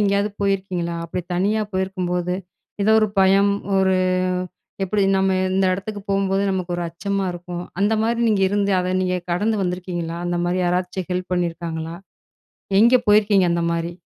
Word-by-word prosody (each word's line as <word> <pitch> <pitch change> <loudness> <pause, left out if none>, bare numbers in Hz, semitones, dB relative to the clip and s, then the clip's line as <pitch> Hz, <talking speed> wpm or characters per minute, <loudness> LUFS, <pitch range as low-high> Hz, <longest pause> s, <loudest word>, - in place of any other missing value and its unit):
எங்கேயாவது 200 0 +2
போயிருக்கீங்களா? 185 -4 -1
அப்டி 170 +2 -4
தனியா 205 +4 +1
போயிருக்கும்போது, 180 -2 -1 0.5
ஏதோ 220 - +4
ஒரு 215 - +2
பயம், 195 +1 +4 0.3
ஒரு 190 -1 +3 0.9
எப்டி? 200 +2 0
நம்ம 190 0 +2 0.2
இந்த 195 0 +2
இடத்துக்கு 205 +3 -4
போகும்போது 195 0 +1
நமக்கு 185 -2 -2
ஒரு 175 - -2
அச்சமா 195 +4 -2
இருக்கும். 175 0 -6 0.2
அந்த 210 +2 +3
மாரி 230 +1 0
நீங்க 205 -3 +2
இருந்து, 200 0 0
அத 185 0 -1
நீங்க 185 0 0 0.2
கடந்து 210 +5 0
வந்துருக்கீங்களா? 180 -2 -3
அந்த 175 0 -1
மாரி 180 +1 0
யாராச்சும் 180 +1 -1
ஹெல்ப் 180 0 -3
பண்ணியிருக்காங்களா? 165 -2 -3 0.9
எங்க 235 +3 +6
போயிருக்கீங்க 205 -2 +5
அந்த 170 0 0
மாரி? 170 +1 -2
185 Hz, 150 wpm, -21 LUFS, 175-200 Hz, 0.9 s, எங்க